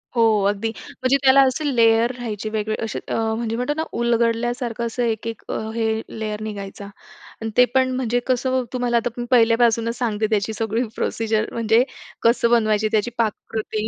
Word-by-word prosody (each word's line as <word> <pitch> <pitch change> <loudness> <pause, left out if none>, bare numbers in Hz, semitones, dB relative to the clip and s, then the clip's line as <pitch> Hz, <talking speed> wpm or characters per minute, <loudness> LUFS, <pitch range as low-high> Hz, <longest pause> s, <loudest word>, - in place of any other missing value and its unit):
हो 230 - +3 0.3
अगदी. 205 +2 -2 0.3
म्हणजे 255 +2 +3
त्याला 270 +1 +7
असे 280 +4 -2
लेयर 230 0 +4
राहायचे 215 -3 -4
वेगळे 215 0 -2
असे 225 - -3
अ, - - -2 0.2
म्हणजे 225 0 -2
म्हणतो 250 +5 -1
ना 320 - 0 0.2
उलगडल्यासारखं 235 0 0
असं 235 +1 -2
एक, 225 -1 -1
एक 225 - -5 0.3
हे 220 -1 0 0.2
लेयर 215 -1 -3
निघायचा 200 -2 -6 0.6
आणि 225 - -3
ते 250 - +8
पण 260 0 +3
म्हणजे 245 -2 0
कसं, 255 0 +1
तुम्हाला 245 -1 +1
आता 235 +1 0
मी 240 - -3
पहिल्यापासूनच 230 -1 +3
सांगते, 220 -3 0
त्याची 215 0 0
सगळी 225 +1 -1
प्रोसिजर. 220 -1 0
म्हणजे 230 +1 +3 0.4
कसं 235 0 +3
बनवायची 215 -2 +3
त्याची 220 +2 +1
पाककृती 220 -1 -2
230 Hz, 165 wpm, -22 LUFS, 220-240 Hz, 0.6 s, ते